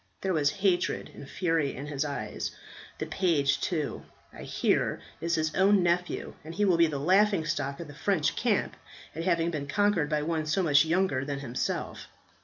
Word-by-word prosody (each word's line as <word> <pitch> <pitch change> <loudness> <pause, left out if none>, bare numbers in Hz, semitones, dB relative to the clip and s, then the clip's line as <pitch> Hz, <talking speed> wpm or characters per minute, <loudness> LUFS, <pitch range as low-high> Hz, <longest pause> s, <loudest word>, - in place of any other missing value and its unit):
There 190 -1 0
was 150 -3 +3
hatred 185 +2 0
and 140 - -11
fury 165 -6 0
in 135 - -6
his 145 -1 -2
eye. 110 -8 -4 0.6
The - - -3
page 155 -7 +1
too, 155 -5 -2 0.3
I - - -10
hear, - - 0 0.2
is 170 0 0
his 155 -1 -1
own 195 0 +4
nephew, 175 +1 -1
and 160 +2 -8
he 205 +2 +2
will 180 -4 +3
be 165 0 +5
the 150 -2 -3
laughing 190 +3 +3
stock 140 -2 -2
of 170 - -6
the 145 - -10
French 160 0 0
camp - - 0 0.4
at 165 +1 -4
having 170 -2 +2
been 145 -3 -4
conquered 195 -2 +1
by 150 -1 0
one 160 -1 -1
so 170 +5 +1
much 145 -2 +5
younger 165 -5 +1
than 140 -1 -4
himself. 125 -2 -3
160 Hz, 190 wpm, -28 LUFS, 145-180 Hz, 0.6 s, be